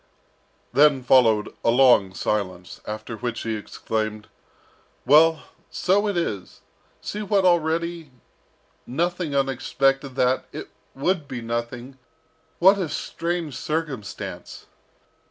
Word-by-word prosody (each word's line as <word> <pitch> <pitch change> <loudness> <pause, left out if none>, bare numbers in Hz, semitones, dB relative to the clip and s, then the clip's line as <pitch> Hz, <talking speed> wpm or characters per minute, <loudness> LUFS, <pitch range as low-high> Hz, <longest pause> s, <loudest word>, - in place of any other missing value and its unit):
Then 145 -2 +5
followed 115 -5 +4
a - - +3
long 120 -7 +5
silence, 90 -5 -3
after 110 +2 -5
which 120 +1 -4
he 115 -1 -2
exclaimed, 110 0 -4 0.8
"Well, 155 +3 +5 0.3
so 200 +3 +1
it 200 -3 -1
is! 105 - -4 0.4
see 210 - -5
what 200 -2 +1
already 170 -1 +1 0.8
nothing 170 +2 -2
unexpected 135 0 0
that 130 0 +1
it - - -8 0.2
would 155 +2 -1
be 125 -3 -5
nothing 120 +3 -5 0.6
what 195 +3 +5
a 175 -5 -2
strange 170 -2 -3
circumstance!" 150 -9 -5
135 Hz, 105 wpm, -24 LUFS, 115-165 Hz, 0.8 s, Then